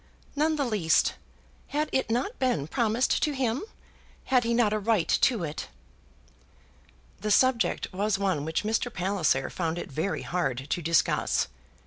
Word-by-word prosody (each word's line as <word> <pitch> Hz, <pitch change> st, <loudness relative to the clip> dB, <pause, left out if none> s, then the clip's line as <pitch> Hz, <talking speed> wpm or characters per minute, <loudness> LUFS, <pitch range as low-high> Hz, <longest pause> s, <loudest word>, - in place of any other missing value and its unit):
"None 310 Hz, +2 st, +2 dB
the 285 Hz, -2 st, 0 dB
least. 205 Hz, -9 st, +2 dB, 0.5 s
Had 300 Hz, +2 st, -1 dB
it 265 Hz, -, 0 dB
not 250 Hz, -, -1 dB
been 250 Hz, -, +1 dB
promised 235 Hz, -, +1 dB
to 300 Hz, -, +1 dB
him? 260 Hz, -1 st, -1 dB, 0.6 s
Had 255 Hz, -2 st, +2 dB
he 230 Hz, -, -1 dB
not 230 Hz, -3 st, +3 dB
a 215 Hz, -, 0 dB
right 210 Hz, -4 st, +1 dB
to 230 Hz, -8 st, +2 dB
it?" 155 Hz, -1 st, -5 dB, 1.5 s
The 210 Hz, -, -3 dB
subject 230 Hz, -2 st, +3 dB
was 200 Hz, +1 st, 0 dB
one 190 Hz, -7 st, 0 dB
which 160 Hz, +4 st, -1 dB
Mr. 225 Hz, +3 st, 0 dB
Palliser 180 Hz, -8 st, 0 dB
found 165 Hz, -2 st, -2 dB
it -, -, -6 dB
very 160 Hz, +8 st, -2 dB
hard 135 Hz, -8 st, -2 dB
to 175 Hz, -, 0 dB
discuss. 165 Hz, 0 st, +1 dB
210 Hz, 150 wpm, -27 LUFS, 170-245 Hz, 1.5 s, not